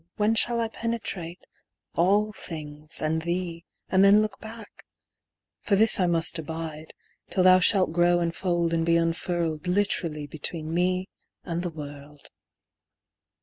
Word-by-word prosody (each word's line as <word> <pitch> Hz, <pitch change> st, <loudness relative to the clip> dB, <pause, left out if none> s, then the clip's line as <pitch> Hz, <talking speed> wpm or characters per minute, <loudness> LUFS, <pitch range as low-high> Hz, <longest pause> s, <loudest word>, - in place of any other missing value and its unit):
When 210 Hz, +1 st, +2 dB
shall 235 Hz, +1 st, +3 dB
I 230 Hz, -, 0 dB
penetrate 215 Hz, -7 st, -5 dB, 0.5 s
all 205 Hz, +5 st, +2 dB
things 150 Hz, -4 st, -4 dB
and 160 Hz, +1 st, 0 dB
thee, 170 Hz, 0 st, -3 dB, 0.2 s
And 190 Hz, 0 st, +3 dB
then 200 Hz, +1 st, +7 dB
look 215 Hz, -1 st, -2 dB
back? 220 Hz, -1 st, -11 dB, 0.8 s
For 200 Hz, -, +1 dB
this 220 Hz, +1 st, +3 dB
I 180 Hz, -, +3 dB
must 165 Hz, -1 st, +1 dB
abide, 160 Hz, 0 st, -6 dB, 0.3 s
Till 185 Hz, -, +1 dB
thou 185 Hz, 0 st, +7 dB
shalt 185 Hz, -2 st, +3 dB
grow 175 Hz, 0 st, +3 dB
and 170 Hz, -1 st, -1 dB
fold 175 Hz, -2 st, 0 dB
and 165 Hz, 0 st, +1 dB
be 165 Hz, 0 st, +2 dB
unfurled 165 Hz, -1 st, -1 dB
Literally 180 Hz, -5 st, -1 dB
between 155 Hz, +2 st, -4 dB
me 185 Hz, +2 st, 0 dB, 0.4 s
and 170 Hz, -1 st, -3 dB
the 175 Hz, -, -3 dB
world. 145 Hz, -2 st, -10 dB
175 Hz, 145 wpm, -26 LUFS, 160-195 Hz, 0.8 s, then